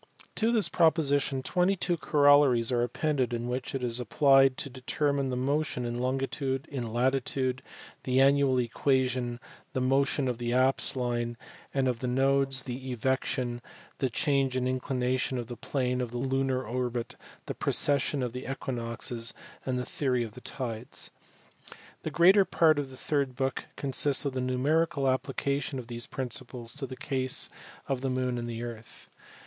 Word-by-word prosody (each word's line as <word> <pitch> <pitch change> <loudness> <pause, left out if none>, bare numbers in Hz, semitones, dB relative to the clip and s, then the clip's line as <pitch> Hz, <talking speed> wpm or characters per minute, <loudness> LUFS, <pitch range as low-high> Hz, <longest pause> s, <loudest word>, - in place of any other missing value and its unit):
To 225 +1 +1
this 225 -4 +3
proposition 145 -5 +2
twenty 180 +6 +2
two 175 -1 0
corollaries 145 -6 +4
are 120 -1 +2
appended 125 0 0
in 120 +1 -3
which 125 +2 -3
it 130 - -3
is 120 0 0
applied 135 +2 +4
to - - -3
determine 140 +2 -1
the 125 - -1
motion 135 0 -1
in 120 0 -3
longitude, 135 +1 -1
in 120 -5 -4
latitude, 130 +1 0 0.4
the 130 0 +1
annual 135 -1 +4
equation, 125 0 0 0.3
the - - 0
motion 135 +1 +2
of 125 -2 -2
the 120 0 -1
apse 130 +2 +3
line, 120 -2 -2 0.3
and 135 -1 +1
of 125 -2 0
the 125 - -3
nodes, 135 +1 +2
the 130 +1 -5
evection, 125 0 -1 0.4
the 130 - +1
change 135 +1 +1
of 130 -1 0
inclination 130 0 -1
of 120 - -3
the 120 +1 -7
plane 125 +1 -1
of 125 - -2
the 120 - -5
lunar 130 0 0
orbit, 120 0 -3 0.3
the - - -4
precession 140 -1 +1
of 120 -2 -3
the 125 +1 -5
equinoxes, 115 -2 -3 0.3
and 130 -1 0
the 125 - -2
theory 125 -4 0
of 115 - -6
the 125 - -12
tides. 120 -3 -5 0.9
The - - -3
greater 190 +4 +6
part 160 -5 +3
of 140 -2 -3
the 130 - -12
third 140 -3 -1
book 135 0 -2
consists 140 +1 +2
of 140 - -1
the 130 - -2
numerical 140 +4 +1
application 135 +1 -1
of 125 - -6
these 120 0 -5
principles 125 -2 -5
to 140 -2 -4
the 130 - -8
case 130 -2 0 0.4
of 135 -2 -1
the 135 - -1
moon 130 -1 -1
and 120 0 -4
the 115 0 -4
earth. 115 -2 -9
130 Hz, 165 wpm, -29 LUFS, 125-140 Hz, 0.9 s, greater